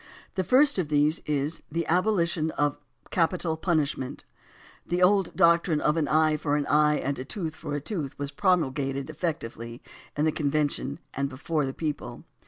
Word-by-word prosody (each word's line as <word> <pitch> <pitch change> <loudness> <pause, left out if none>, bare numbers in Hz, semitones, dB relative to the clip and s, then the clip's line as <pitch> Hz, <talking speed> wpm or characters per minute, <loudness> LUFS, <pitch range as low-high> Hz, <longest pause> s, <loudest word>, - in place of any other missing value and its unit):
The 190 - 0
first 270 - +4
of 175 - 0
these 150 +2 +2
is 150 +2 -1
the 165 +1 -1
"Abolition 170 -3 +1
of 145 -1 +2 0.4
Capital 170 -1 +1
Punishment." 145 -5 -1 0.6
The 180 +1 0
old 195 -1 +3
doctrine 170 -2 +4
of 150 - +2
"an 160 -3 +1
eye 155 0 +3
for 145 -1 0
an 145 -1 0
eye 150 0 +4
and 140 0 -2
a - - -3
tooth 160 +2 -5
for 145 - -5
a - - -1
tooth" 150 -4 -4
was 145 0 -4
promulgated 140 -8 0
effectively 120 -8 -4 0.4
in 150 - +2
the 155 - +3
convention 145 -2 -1 0.2
and 140 0 -1
before 145 +2 -1
the 135 - -4
people. 145 -6 -4
155 Hz, 170 wpm, -27 LUFS, 145-170 Hz, 0.6 s, first